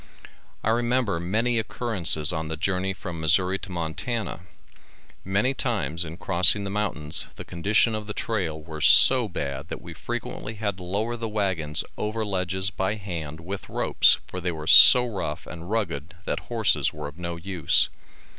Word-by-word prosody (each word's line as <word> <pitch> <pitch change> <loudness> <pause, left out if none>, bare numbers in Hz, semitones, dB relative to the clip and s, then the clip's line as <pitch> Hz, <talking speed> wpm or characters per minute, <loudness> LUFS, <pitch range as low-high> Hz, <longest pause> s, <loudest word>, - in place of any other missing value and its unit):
I 110 - +1
remember 120 -5 0
many 115 +7 0
occurrences 95 -8 0
on 80 -1 -3
the 80 0 -5
journey 95 +2 -1
from 90 -4 -7
Missourri 90 +4 +2
to 95 - -9
Montana. 90 +7 -4 0.8
Many 100 +8 0
times 100 - -2
in 85 0 -8
crossing 95 +2 +4
the 100 - -5
mountains 85 -7 -1
the - - -9
conditions 105 +6 +1
of 105 -1 -6
the 105 - -4
trail 90 -9 -3
were 80 0 -9
so 125 - +7
bad 70 -4 -5
that - - -7
we - - -10
frequently 110 - -6
had 100 -3 -3
to 90 - -10
lower 105 +6 -2
the 115 -1 -5
wagons 95 -8 -1 0.2
over 110 +1 -2
ledges 95 0 -1
by 95 +2 -2
hand 85 -6 -7
with 95 +4 -7
ropes - - +4
for 90 - -8
they 90 0 -2
were 80 -2 -7
so 125 +9 +9
rough 105 -6 -5
and 85 +1 -10
rugged 85 -9 -3
that - - -2
horses 110 - +1
were 75 -1 -7
of 75 +4 -12
no 85 -1 -4
use. 85 -2 +2
95 Hz, 170 wpm, -24 LUFS, 85-110 Hz, 0.8 s, so